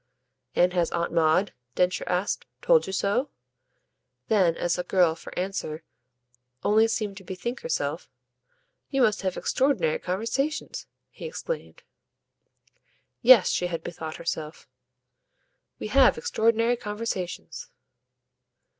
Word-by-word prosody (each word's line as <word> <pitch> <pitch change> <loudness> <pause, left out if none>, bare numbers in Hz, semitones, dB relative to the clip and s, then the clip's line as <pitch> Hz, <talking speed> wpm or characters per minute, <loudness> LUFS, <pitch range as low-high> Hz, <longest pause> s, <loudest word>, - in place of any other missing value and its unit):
"And 180 +1 +4
has 175 -2 +1
Aunt 170 0 -1
Maud," 165 +4 +3 0.2
Densher 180 0 +1
asked, 180 +3 -1 0.2
"told - - +4
you - - -4
so?" 205 +8 0 1.0
Then 185 -6 +3
as 175 - 0
the 180 - -1
girl, 175 -2 +3
for 165 - -11
answer, 180 -4 -3 0.8
only 220 +2 +4
seemed 215 -3 -2
to 195 - -10
bethink 190 +8 -5
herself, 485 - -2 0.8
"You 270 -2 +2
must 215 -3 +2
have 185 -2 -2
extraordinary 255 - +1
conversations!" 230 - -2 0.2
he - - -9
exclaimed. 480 +1 -6 1.4
Yes, 235 -5 +7
she 180 - 0
had 165 -2 -4
bethought 165 -2 -6
herself. 160 -2 -5 1.1
"We - - -5
have - - +5
extraordinary 230 - +2
conversations." 210 -7 -5
195 Hz, 115 wpm, -26 LUFS, 175-230 Hz, 1.4 s, Yes